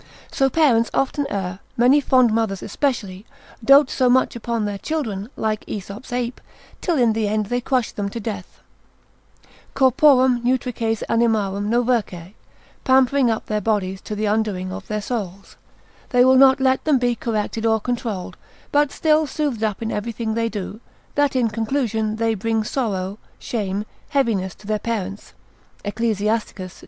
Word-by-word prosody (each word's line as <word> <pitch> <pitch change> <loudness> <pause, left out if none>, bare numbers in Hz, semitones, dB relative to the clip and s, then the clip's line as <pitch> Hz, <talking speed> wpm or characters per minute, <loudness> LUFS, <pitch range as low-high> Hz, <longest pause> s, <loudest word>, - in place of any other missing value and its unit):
So 270 -1 +2
parents 250 -7 +3
often 275 +1 0
err, 190 -1 -3 0.2
many 255 +5 +5
fond 255 -4 +4
mothers 220 -4 -1
especially, 210 -5 -2 0.4
dote 275 +2 +6
so 255 -2 +2
much 255 0 +3
upon 230 -2 -2
their 205 -1 -3
children, 220 -7 -3
like 215 -1 -2
Aesop's 205 +5 -7
ape, 245 0 -3 0.4
till 345 -4 0
in 235 -4 +3
the 220 -1 0
end 215 0 0
they 245 +4 -1
crush 250 -2 0
them 200 -1 -3
to 230 - -6
death, 205 -4 -7 1.1
Corporum 260 -2 +4
nutrices 240 -3 -1
animarum 210 -3 +1
novercae, 225 -7 0 0.5
pampering 260 0 +4
up 225 - -1
their 210 -1 -1
bodies 195 -3 -1
to 210 - -6
the 215 +1 -1
undoing 205 -3 -1
of 200 0 -8
their 210 -1 -3
souls: 200 -5 -5 0.5
they 245 0 +4
will 260 - +6
not 265 0 +6
let 265 0 +2
them 300 -3 +3
be 245 -1 +1
corrected 225 -1 -3
or 220 0 +3
controlled, 225 -6 -4 0.3
but 290 -1 +3
still 310 -1 +2
soothed 275 -6 -2
up 215 0 -1
in 225 - -2
everything 225 +1 -3
they 230 0 0
do, 210 0 -6 0.3
that 290 -2 +1
in 250 -3 +3
conclusion 220 -1 -1
they 225 0 +1
bring 220 +1 -1
sorrow, 205 -5 -2 0.2
shame, 205 -3 -3 0.2
heaviness 225 -10 0
to 205 - -18
their 215 0 -1
parents 205 -3 -4 0.5
(Ecclus. 210 0 -1
225 Hz, 155 wpm, -21 LUFS, 205-255 Hz, 1.1 s, dote